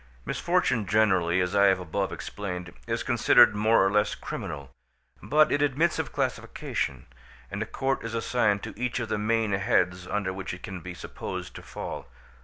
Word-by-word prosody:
Misfortune 110 -5 +1
generally, 95 -4 +3
as 90 +2 -1
I 100 0 +6
have 95 -2 +4
above 95 +3 -2
explained, 90 -4 -5
is - - -1
considered - - +5
more 110 -1 +4
or 95 - +2
less 105 0 +2
criminal, 70 -3 -6 0.5
but 150 - +4
it 145 - +2
admits 145 +4 +2
of - - -2
classification, - - -2 0.5
and 100 - -4
a 110 - -2
court 135 +3 -1
is 115 0 -4
assigned 115 -3 +1
to - - -6
each 125 +2 -2
of 115 -2 -3
the 105 - 0
main 110 0 +1
heads 90 -2 +1
under 100 -2 -1
which 95 -1 -5
it 90 - -15
can 95 -4 -6
be 90 +1 -8
supposed - - -6
to - - -9
fall. - - -7
100 Hz, 180 wpm, -27 LUFS, 90-115 Hz, 0.5 s, I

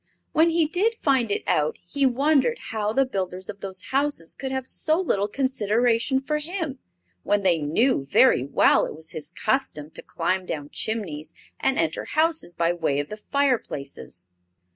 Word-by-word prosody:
When 320 +2 +4
he 330 -1 +3
did 385 +9 +1
find 265 - +1
it 205 - -1
out 150 0 +1
he 275 +8 +1
wondered 285 - +2
how 215 -1 -1
the 270 +4 +3
builders 185 -5 -4
of 200 - -7
those 190 -1 -5
houses 275 - 0
could 265 -1 -5
have 265 -1 -2
so 315 +5 +1
little 205 - +1
consideration 240 +1 +1
for 300 +2 -1
him, 315 -4 -4 0.4
when 205 - +1
they 175 -3 +3
knew 150 - +1
very 130 - +5
well 140 - +3
it - - -8
was 160 +1 -10
his 155 -1 -5
custom 165 - -1
to - - -9
climb 185 0 -2
down 145 -1 -5
chimneys 165 -8 -3 0.2
and 270 - +1
enter 165 -1 0
houses 315 - 0
by 170 0 +2
way 160 -5 0
of 145 - -3
the 215 - -6
fireplaces. 215 - -2
220 Hz, 170 wpm, -25 LUFS, 170-275 Hz, 0.4 s, very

